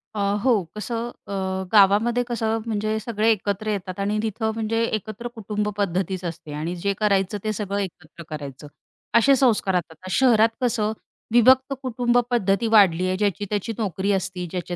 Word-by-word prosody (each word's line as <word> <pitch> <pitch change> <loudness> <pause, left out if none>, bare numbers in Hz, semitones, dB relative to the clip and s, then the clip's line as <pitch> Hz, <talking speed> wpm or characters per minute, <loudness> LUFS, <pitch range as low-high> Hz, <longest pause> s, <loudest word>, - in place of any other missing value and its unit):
अ, 210 - -3 0.2
हो, 265 - +4 0.2
कसं 230 +2 -3 0.2
अ, 200 - -5 0.4
गावामध्ये 215 +4 +4
कसं 225 -2 -1
म्हणजे 215 0 -1
सगळे 220 0 0
एकत्र 205 0 -2
येतात 185 -1 -4
आणि 205 +2 0
तिथं 220 +1 -1
म्हणजे 225 +1 -1
एकत्र 215 +1 -3
कुटुंब 210 -1 -2
पद्धतीच 190 -1 -1
असते 165 -2 -6
आणि 160 +4 -3
जे 200 +3 -1
करायचं 200 -1 +1
ते 215 - -1
सगळं 200 -1 -3
एकत्र 175 -3 -7
करायचं. 145 -2 -7 0.5
असे 270 +4 +6
संस्कारात. 210 -8 +2
आता 160 +4 -13
शहरात 230 0 +4
कसं 225 -3 +1 0.4
विभक्त 260 +3 +5
कुटुंबपद्धती 240 -4 +1
वाढली 185 -5 +5
आहे 185 - 0
ज्याची 205 0 0
त्या्याची 210 +2 -2
नोकरी 200 -2 -1
असती, 190 -2 -2
ज्याचे 180 -1 -4
210 Hz, 155 wpm, -23 LUFS, 190-225 Hz, 0.5 s, असे